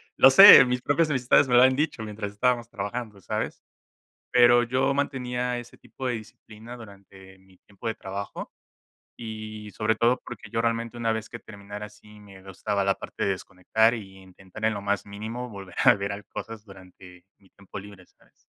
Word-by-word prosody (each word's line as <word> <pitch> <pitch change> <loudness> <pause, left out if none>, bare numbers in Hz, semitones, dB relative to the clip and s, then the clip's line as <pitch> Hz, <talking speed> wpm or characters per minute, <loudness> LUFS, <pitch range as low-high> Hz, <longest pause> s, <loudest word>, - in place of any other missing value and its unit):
Lo - - +7
sé, 195 +1 +10
mis 125 -1 -2
propias 155 +4 +1
amistades 130 0 +3
me 125 - +3
lo 120 - +7
han 130 0 +4
dicho 145 -4 -2
mientras 105 -1 -6
estábamos 120 +2 0
trabajando, 105 0 -6
¿sabes? - - -4 0.7
Pero 120 0 +5
yo 130 +3 0
mantenía 125 -3 -2
ese 120 0 -10
tipo 135 - -10
de 125 - -1
disciplina 110 +1 -12
durante 95 -4 -15
mi 95 -1 -24
tiempo 100 +5 -11
de 110 - -2
trabajo, 100 +1 -7 0.7
y 110 -1 -8
sobre 110 0 0
todo 120 +3 +2
porque 110 -2 -10
yo 115 - -1
realmente, 115 0 -2
una 115 -1 0
vez 110 0 -5
que 120 - -9
terminara 105 -1 -10
así 105 0 -17
me 100 -2 -15
gustaba 95 +1 -3
la 100 0 +2
parte - - -6
de 100 - +1
desconectar, 110 +5 0
y 95 -4 -9
intentar 95 +2 -12
en 110 0 +2
lo 100 - -5
más 100 0 -2
mínimo 110 +5 -6
volver 95 -3 -10
a 120 - +7
ver 100 0 -5
cosas 115 -2 -8
durante, 90 -2 -16
mi 95 - -25
tiempo 100 0 -11
libre, 100 -2 -13
¿sabes? - - -31
110 Hz, 185 wpm, -25 LUFS, 100-120 Hz, 0.7 s, sé